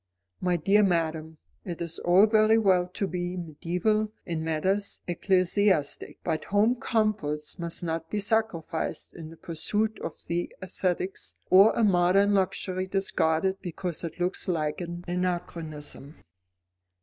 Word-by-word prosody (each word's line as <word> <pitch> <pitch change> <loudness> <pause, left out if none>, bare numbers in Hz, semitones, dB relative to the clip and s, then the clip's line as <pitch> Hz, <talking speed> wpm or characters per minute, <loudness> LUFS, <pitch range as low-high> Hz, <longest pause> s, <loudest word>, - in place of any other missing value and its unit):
"My 180 -1 +1
dear 195 +6 +4
madam, 160 -4 0 0.3
it 175 -3 -6
is 170 -1 -3
all 180 +4 +5
very 220 0 +4
well 185 -5 +3
to 185 +2 -3
be 180 0 -3
mediaeval 180 +6 -1
in 165 -2 -3
matters 190 +6 0
ecclesiastic, 185 -3 +1
but 155 -1 -2
home 210 +4 +3
comforts 215 -12 -1
must 170 0 -3
not 165 -1 -3
be 210 - -1
sacrificed 200 -6 -1
in 160 -2 -9
the 165 - -13
pursuit 210 +8 -2
of - - -5
the 170 +1 -2
aesthetic, 185 0 -2 0.3
or 195 +4 +8
a 235 - +1
modern 195 +1 +4
luxury 190 -1 0
discarded 190 -1 0
because 175 -2 -4
it 170 +1 -6
looks 180 +1 0
like 155 -3 -1
an 175 0 -6
anachronism." 170 -5 -4
180 Hz, 135 wpm, -27 LUFS, 165-200 Hz, 0.3 s, or